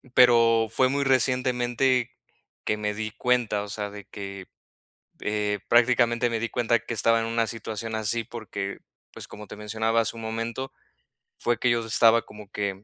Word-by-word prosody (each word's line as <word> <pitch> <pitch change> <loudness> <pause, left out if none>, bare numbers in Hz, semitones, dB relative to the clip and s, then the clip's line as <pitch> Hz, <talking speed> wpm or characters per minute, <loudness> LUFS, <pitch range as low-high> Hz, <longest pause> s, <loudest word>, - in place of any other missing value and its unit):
pero 115 -2 +5
fue 130 +2 +3
muy 140 +1 0
recientemente, 125 -1 +2 0.5
que 105 - 0
me 105 0 -2
di 110 0 -4
cuenta, 120 -4 0
o - - -8
sea, 105 -1 -4
de 100 -3 -10
que, 100 -2 -8 0.7
eh, 105 -1 -1
prácticamente 120 0 +3
me 115 - -1
di 115 - -1
cuenta 120 -1 +2
que 115 - -5
estaba 115 +1 +3
en 115 - -2
una 115 0 0
situación 110 0 -5
así 110 +1 -1
porque, 105 -4 -6 0.3
pues, - - -9
como 105 0 -10
te - - -10
mencionaba 110 +2 0
hace 110 - -3
un 115 - -8
momento, 115 +4 -4 0.7
fue 120 -1 0
que 125 - +2
yo 115 -1 0
estaba 115 +1 +4
como 105 -2 -13
que, 100 -1 -3
115 Hz, 175 wpm, -26 LUFS, 105-120 Hz, 0.7 s, pero